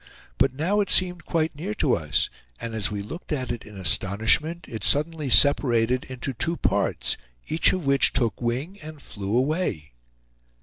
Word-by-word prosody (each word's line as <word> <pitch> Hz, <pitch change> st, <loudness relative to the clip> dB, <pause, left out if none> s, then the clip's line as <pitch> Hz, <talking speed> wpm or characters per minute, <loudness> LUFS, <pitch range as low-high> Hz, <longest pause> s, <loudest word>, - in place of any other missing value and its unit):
But -, -, +2 dB
now 180 Hz, +9 st, +1 dB
it 200 Hz, -, -2 dB
seemed 180 Hz, -2 st, +1 dB
quite 160 Hz, -2 st, -1 dB
near 190 Hz, +8 st, -4 dB
to 145 Hz, -10 st, +1 dB
us; 75 Hz, -2 st, -1 dB, 0.3 s
and 115 Hz, -, -5 dB
as 110 Hz, -2 st, +1 dB
we 100 Hz, -1 st, -4 dB
looked 165 Hz, -, -9 dB
at 130 Hz, -5 st, -2 dB
it 120 Hz, -, -4 dB
in 105 Hz, -2 st, -12 dB
astonishment, 110 Hz, -, +1 dB
it 110 Hz, -5 st, -7 dB
suddenly 150 Hz, -1 st, +1 dB
separated 125 Hz, -2 st, +4 dB
into 130 Hz, +1 st, -5 dB
two 165 Hz, +8 st, -1 dB
parts, -, -, 0 dB, 0.3 s
each 160 Hz, -, +3 dB
of 185 Hz, -5 st, -3 dB
which 140 Hz, 0 st, +4 dB
took 115 Hz, -4 st, 0 dB
wing 135 Hz, +12 st, -3 dB
and 155 Hz, -1 st, -10 dB
flew 105 Hz, -4 st, -3 dB
away. 130 Hz, -, -1 dB
135 Hz, 170 wpm, -25 LUFS, 115-160 Hz, 0.3 s, separated